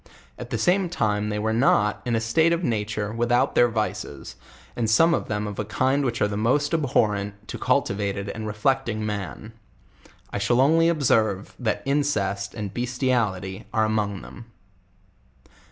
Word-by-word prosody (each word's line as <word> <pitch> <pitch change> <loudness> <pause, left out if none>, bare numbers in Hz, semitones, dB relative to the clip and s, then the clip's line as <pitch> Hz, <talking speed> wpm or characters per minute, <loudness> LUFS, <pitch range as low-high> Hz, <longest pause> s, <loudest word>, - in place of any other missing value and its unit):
At - - -8
the - - -2
same 185 0 +2
time 105 -9 0
they 105 - -2
were 110 +1 0
not, 110 -3 +2
in 120 -1 0
a - - +2
state 160 +9 +2
of 170 +1 -1
nature, 105 -4 -2
without 120 +1 +1
their 120 - +5
vices, 110 -2 -4 0.4
and 115 -2 -1
some 165 +9 +5
of - - -2
n 105 0 -1
of 105 -1 -6
a - - 0
kind 130 +6 +1
which 120 -4 0
are - - +3
the 105 - -4
most 130 +9 +1
abhorrent 105 -8 0
to - - -5
cultivated 100 0 0
ana 110 -1 -5
reflecting 110 0 0
man. 105 +1 -5 0.8
I - - -1
shall 120 +5 +2
only 165 +5 +4
observe, 110 - +1
that 110 -4 -1
incest 105 -9 -1
and 105 -3 -5
bestiality 120 -7 -1
are 110 - +2
among 105 -3 -1
them. 120 - -11
110 Hz, 165 wpm, -24 LUFS, 105-130 Hz, 0.8 s, their